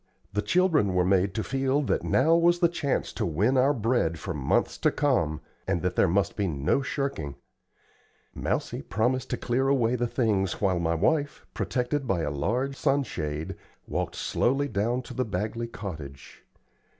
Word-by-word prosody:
The 105 - +1
children 160 - +2
were 90 -1 +3
made 95 0 +2
to 110 - -1
feel 135 +2 0
that - - 0
now 155 +6 +3
was 170 +1 +4
the 175 -1 +4
chance 160 -5 -2
to - - -2
win 100 - +1
our 130 +2 +4
bread 115 - +1
for - - -5
months - - 0
to - - +3
come, 90 - +1 0.3
and 85 - 0
that 90 0 0
there - - +4
must 95 +1 +1
be 100 -3 0
no 75 - +1
shirking. 135 - -3 1.0
Mousie - - -2
promised 125 +5 -1
to - - -1
clear 130 +2 0
away 125 -3 +2
the 120 0 0
things 105 -7 0
while 95 -3 +1
my 85 0 0
wife, 145 - 0
protected 130 +2 -1
by 95 -6 +1
a 75 - -1
large 120 - -1
sun 140 +1 +2
shade, 75 - -4 0.3
walked - - -2
slowly 135 +4 +1
down 120 +2 -1
to 125 - -9
the 130 +1 0
Bagley 110 +3 -3
cottage. 80 - -9
115 Hz, 175 wpm, -27 LUFS, 90-135 Hz, 1.0 s, was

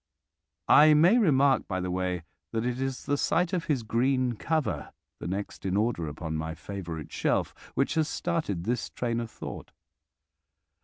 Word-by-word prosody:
I 150 +1 +8
may 175 +11 +6
remark 140 - +4
by 95 -2 -2
the 90 0 -2
way 90 -2 -1 0.3
that 115 +1 0
it 125 +1 -1
is 135 -1 -3
the 145 0 +1
sight 180 +2 +1
of 175 -2 0
his 135 -6 0
green 125 +3 +1
cover, 125 - -2 0.3
the - - -5
next 100 +3 -4
in 95 0 0
order 105 -7 0
upon 80 +2 -5
my 80 +1 -4
favourite 85 -6 -6
shelf, - - 0 0.2
which - - +1
has 160 -2 +2
started 155 - -2
this 120 +4 -1
train 120 -1 -2
of 115 -1 -4
thought. - - -8
120 Hz, 165 wpm, -28 LUFS, 90-145 Hz, 0.3 s, I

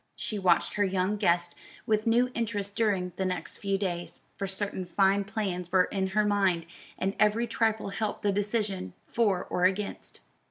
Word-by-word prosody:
She 210 - -4
watched 180 -3 +3
her 205 - +2
young 190 +1 +1
guest 175 -3 +2 0.3
with 215 0 +1
new 245 +2 +3
interest 205 -4 -2
during 195 -5 +1
the 190 - 0
next 185 -1 -3
few 195 -1 0
days; 175 -3 -4
for 195 - -3
certain 195 0 -3
fine 195 +2 +2
plans 195 -4 -3
were 185 -1 +5
in 190 0 -1
her 210 +3 +1
mind, 195 -5 +2 0.3
and 195 +1 -1
every 215 +2 +3
trifle 225 -2 0
helped 210 +1 -3
the 205 - +3
decision 205 - -1
for 205 -6 +1
or 180 - 0
against. 195 +2 -2
200 Hz, 170 wpm, -29 LUFS, 185-210 Hz, 0.3 s, were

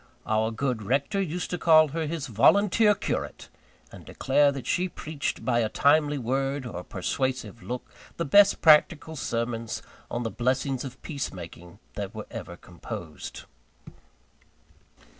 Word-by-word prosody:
Our 110 +1 +1
good 120 0 -2
rector 140 - 0
used 180 -1 -3
to 180 - -2
call 155 -2 +6
her 160 +2 -3
his 160 -2 -3
Volunteer 200 - +4
Curate; - - -4 0.4
and - - -12
declare 140 +2 +2
that 135 -2 -6
she 180 +1 0
preached 155 -4 -4
by 120 -2 +2
a 110 -2 +1
timely 145 +3 +3
word, 135 +2 -1
or 115 -7 -5
a - - -8
persuasive 130 +6 -3
look, 125 +1 -5 0.3
the 170 - -1
best 200 +8 +5
practical 160 0 +5
sermons 115 -4 -3 0.3
on 120 - -3
the 115 - -3
blessings 130 +3 -1
of 130 -2 -8
peace 140 -4 -4
making 85 0 -10 0.2
that 100 0 -5
were 110 - -6
ever - - -7
composed. 80 -4 -8
135 Hz, 145 wpm, -27 LUFS, 115-155 Hz, 0.4 s, call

